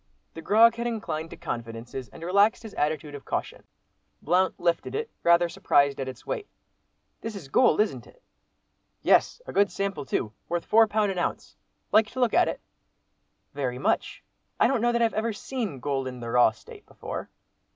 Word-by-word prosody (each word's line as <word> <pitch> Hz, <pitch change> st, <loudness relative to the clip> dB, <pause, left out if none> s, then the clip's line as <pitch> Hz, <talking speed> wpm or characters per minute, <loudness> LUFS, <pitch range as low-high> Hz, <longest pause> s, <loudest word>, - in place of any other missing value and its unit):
The 165 Hz, -, -8 dB
grog 225 Hz, +5 st, +6 dB
had 235 Hz, 0 st, -2 dB
inclined 165 Hz, -9 st, -3 dB
to -, -, -10 dB
confidences 115 Hz, +1 st, -6 dB
and 165 Hz, -, -12 dB
relaxed 200 Hz, +6 st, +3 dB
his 220 Hz, -, -9 dB
attitude 150 Hz, 0 st, -2 dB
of 145 Hz, -, -8 dB
caution. -, -, -4 dB, 0.5 s
Blount 185 Hz, +4 st, +1 dB
lifted 170 Hz, -1 st, 0 dB
it, 450 Hz, +1 st, -3 dB
rather 170 Hz, 0 st, +4 dB
surprised 140 Hz, -4 st, +2 dB
at 135 Hz, -, -3 dB
its 130 Hz, -2 st, -8 dB
weight. 420 Hz, -, -4 dB, 0.7 s
"This 225 Hz, -1 st, -5 dB
is 165 Hz, -9 st, -9 dB
gold, 250 Hz, -, +4 dB
isn't 215 Hz, -, -2 dB
it?" -, -, -21 dB, 0.8 s
"Yes! -, -, +3 dB
a -, -, -8 dB
good 200 Hz, 0 st, +4 dB
sample 195 Hz, -8 st, -3 dB
too. 110 Hz, -4 st, -2 dB, 0.2 s
Worth 175 Hz, 0 st, -2 dB
four 225 Hz, +1 st, +5 dB
pound 210 Hz, -1 st, +1 dB
an 185 Hz, -, -3 dB
ounce. -, -, -3 dB, 0.4 s
Like 215 Hz, 0 st, +5 dB
to 260 Hz, -, -5 dB
look 245 Hz, -2 st, +2 dB
at 360 Hz, -, +4 dB
it?" -, -, -4 dB, 0.9 s
"Very 130 Hz, -3 st, -2 dB
much. 130 Hz, -, -1 dB, 0.4 s
I -, -, +5 dB
don't 260 Hz, -4 st, +2 dB
know 240 Hz, +1 st, +3 dB
that 235 Hz, 0 st, +2 dB
I've 225 Hz, -, +2 dB
ever 220 Hz, +1 st, -1 dB
seen 215 Hz, -, -4 dB
gold 135 Hz, -1 st, -2 dB
in 125 Hz, -1 st, -7 dB
the 115 Hz, -1 st, -5 dB
raw 125 Hz, -1 st, +6 dB
state 110 Hz, -1 st, -14 dB
before." -, -, -7 dB
175 Hz, 185 wpm, -26 LUFS, 140-225 Hz, 0.9 s, grog